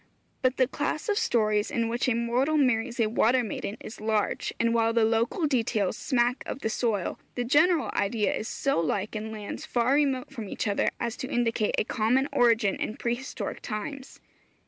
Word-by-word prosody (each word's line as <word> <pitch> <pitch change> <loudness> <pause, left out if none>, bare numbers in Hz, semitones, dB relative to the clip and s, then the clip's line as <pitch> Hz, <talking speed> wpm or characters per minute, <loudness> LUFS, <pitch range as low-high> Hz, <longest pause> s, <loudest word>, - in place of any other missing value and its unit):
But 255 0 +1
the 255 - +4
class 295 - -3
of 410 - +2
stories 215 - +1
in 230 -1 0
which 240 +2 0
a 235 - +2
mortal 245 +6 +1
marries 250 -3 +1
a 230 - +4
water 240 +3 +3
maiden 210 -1 -4
is 220 - -9
large, 215 -1 0
and 230 0 +2
while 230 -1 +2
the 230 -1 +4
local 230 - +1
details 225 -8 0
smack 245 -1 +1
of 275 - -5
the 220 - -1
soil, 215 -7 -1 0.2
the 245 - -1
general 295 - +3
idea 205 +1 +1
is 215 - -3
so 275 -6 0
like 195 +6 -1
in 215 +1 -4
lands 210 -2 -6
far 245 +2 +1
remote 275 -3 +1
from 225 -6 -6
each - - -3
other 200 - +1
as 235 0 -2
to 260 - -5
indicate 230 -3 +1
a - - +3
common 245 +5 +1
origin 230 -4 +3
in 215 - -4
pre 235 - 0
historic 260 +2 -5
times. 260 +6 -6
235 Hz, 190 wpm, -27 LUFS, 220-255 Hz, 0.2 s, the